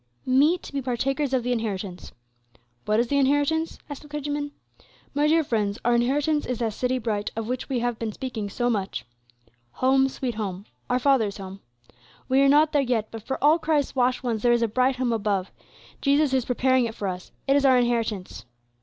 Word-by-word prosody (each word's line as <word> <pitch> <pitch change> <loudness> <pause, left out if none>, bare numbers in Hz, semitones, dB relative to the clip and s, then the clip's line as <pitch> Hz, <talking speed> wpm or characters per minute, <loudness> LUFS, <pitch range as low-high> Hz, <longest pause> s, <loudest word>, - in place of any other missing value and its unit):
"'Meet 290 +7 +3
to - - -10
be 280 - -1
partakers 265 +3 -1
of 260 -2 +1
the 250 - -1
inheritance.' 200 -6 -3 0.7
What 215 +1 +2
is 235 0 +1
the 280 - +2
inheritance?" 290 +4 +1
asked 290 -2 -7
the 295 - -14
clergyman. 290 0 -3 0.6
"My 290 +1 +2
dear 320 +1 +4
friends, 210 -6 -1
our 240 - +4
inheritance 290 +5 +1
is 250 - -2
that 225 -2 -1
city 255 +3 -1
bright 215 -4 -2
of 225 -1 -3
which 250 +3 -4
we 255 -3 -1
have 240 -2 -1
been 225 -2 -2
speaking 225 -3 -5
so 240 +4 -1
much, 200 - -2 0.7
'Home, 265 +1 +3
sweet 255 -2 -3
Home,' 200 -3 -5 0.2
our 250 - +2
Father's 250 -6 +2
home. 195 0 -8 0.7
We 265 +1 +3
are 275 - +5
not 300 +2 +5
there 290 - +3
yet, 240 -5 -1
but 225 - -7
for 265 +5 -4
all 305 +3 +5
Christ's 305 -4 0
washed 255 0 +1
ones 230 -4 -1
there 240 - +3
is 235 0 +2
a - - +2
bright 255 +4 +1
home 250 -2 0
above. 200 -4 -1 0.5
Jesus 280 0 +3
is 260 -2 +1
preparing 260 0 +2
it 225 -1 -5
for 200 - -3
us; 180 -1 -6 0.2
it 275 - +4
is 285 - +3
our 260 -2 +5
inheritance. 230 - -1
250 Hz, 205 wpm, -25 LUFS, 225-275 Hz, 0.7 s, are